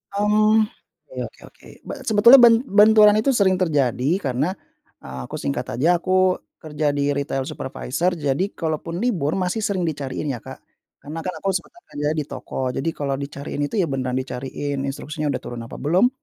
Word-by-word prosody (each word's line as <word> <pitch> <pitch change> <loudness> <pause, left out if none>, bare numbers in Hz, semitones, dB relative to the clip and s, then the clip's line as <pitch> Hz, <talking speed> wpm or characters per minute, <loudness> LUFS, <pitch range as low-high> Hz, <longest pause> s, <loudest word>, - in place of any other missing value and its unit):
Mmm, 215 +1 +4 0.5
ya, - - -2
oke - - -20
oke. - - -19 0.2
B - - -13 0.2
sebetulnya 230 +5 +8
ben 235 0 +6
benturan 210 -2 +6
itu 270 +5 +2
sering 190 -3 +3
terjadi 145 -2 +1
karena, 135 +8 -1 0.5
eee, 65 0 -8
aku, - - -7
singkat 130 -3 -3
aja, 170 +7 +3
aku 185 0 +2 0.2
kerja 150 -1 -2
di 145 0 +1
retail 140 -1 -2
supervisor, 155 +7 -2
jadi 145 +2 0
kalaupun 165 +1 -3
libur, 170 - 0
masih 185 +3 -1
sering 200 -3 -1
dicariin 145 -3 -3
ya 120 - -5
Kak. - - -10 0.5
Karena 155 +3 -6
kan 185 - -4
aku 195 - -2
sebenarnya 345 - -6
kerja 145 +1 -1
di 150 - -1
toko, - - -8 0.2
jadi 140 +6 -1
kalau 140 -2 -2
dicariin 140 +1 -5
itu - - -6
ya, 185 - +3
beneran 130 -1 -2
dicariin, 135 +2 -4
instruksinya 150 +2 -4
udah - - -2
turun 120 -1 -6
apa - - -10
belum, 180 - +3
155 Hz, 175 wpm, -22 LUFS, 140-195 Hz, 0.5 s, sebetulnya